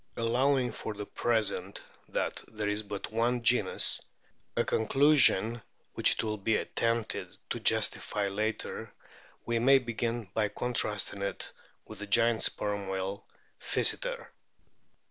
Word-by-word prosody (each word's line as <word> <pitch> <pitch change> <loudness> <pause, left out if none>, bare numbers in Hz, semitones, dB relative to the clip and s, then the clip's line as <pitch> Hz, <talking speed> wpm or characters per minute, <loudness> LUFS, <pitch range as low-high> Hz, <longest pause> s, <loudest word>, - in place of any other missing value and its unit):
Allowing 125 +2 +2
for 110 - -6
the 105 0 -5
present 105 -5 -1 0.3
that - - -2
there 105 -1 -4
is 105 +1 0
but 100 -1 -6
one 120 +2 0
genus, 110 -5 +3 0.6
a - - +4
conclusion 120 -3 +4 0.3
which - - +3
it - - -3
will 110 -1 -2
be 105 +2 +2
at - - -6
tempted 115 -1 -1
to - - -1
justify 105 - +1
later, 105 +3 -3 0.5
we 115 0 0
may 135 +3 +6
begin 120 -1 -2
by 105 -1 +1
contrast 105 -1 0
ing 100 - -8
it 100 - -3 0.3
with 110 - -10
the 105 - -6
giant 115 +2 +3
Sperm 100 -1 +1
whale 95 +1 -4 0.3
Physeter. - - -1
110 Hz, 135 wpm, -30 LUFS, 105-120 Hz, 0.6 s, may